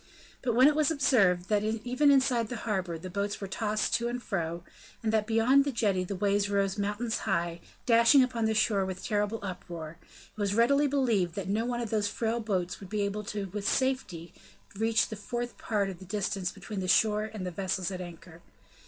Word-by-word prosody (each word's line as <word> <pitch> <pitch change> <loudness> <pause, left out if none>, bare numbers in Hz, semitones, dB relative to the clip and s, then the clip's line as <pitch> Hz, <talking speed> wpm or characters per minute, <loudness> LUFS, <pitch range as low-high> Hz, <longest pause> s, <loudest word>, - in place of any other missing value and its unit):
But 240 -3 0
when 255 +3 +7
it 300 - +4
was 305 0 +2
observed 200 - +3
that 210 -1 +3
even 245 +6 +1
inside 260 -4 +3
the 245 - -4
harbor 185 -6 -1
the 175 +3 -8
boats 200 +2 -2
were 200 - -4
tossed 215 +2 -1
to 235 - +1
and 245 +1 -3
fro, 170 -6 -3 0.4
and 220 -1 0
that 215 -1 +1
beyond 230 +5 +4
the 280 - -2
jetty 205 -6 +1
the 195 +2 -4
waves 200 +1 +1
rose 200 -1 +1
mountains 210 +3 -2
high, 170 -2 0 0.3
dashing 235 +3 +6
upon 240 -3 -1
the 220 0 +1
shore 210 -2 +2
with 190 -1 -5
a - - -14
terrible 210 0 0
uproar, 170 -4 -7
it - - -20
was 200 0 0
readily 280 +6 +4
believed 230 -11 +1
that 195 -2 -4
not 220 +4 0
one 240 -1 -2
of 230 - -4
those 210 -2 +1
frail 225 +2 -1
boats 185 -5 -2
would 195 - -10
be 210 0 -1
able 200 +1 -2 0.3
with 205 -1 -1
safety 255 -11 -1 0.4
to 195 - -12
reach 225 +1 +2
a - - -3
fourth 240 +3 -5
part 205 -3 0
of 190 -3 -7
the 190 - -11
distance 195 -2 -2
between 195 +1 -7
the 185 - -3
shore 215 +3 +3
and 205 -4 -6
the 180 - -3
vessels 190 0 -2
at 185 -1 -5
anchor. 170 -1 -11
210 Hz, 215 wpm, -29 LUFS, 190-235 Hz, 0.4 s, when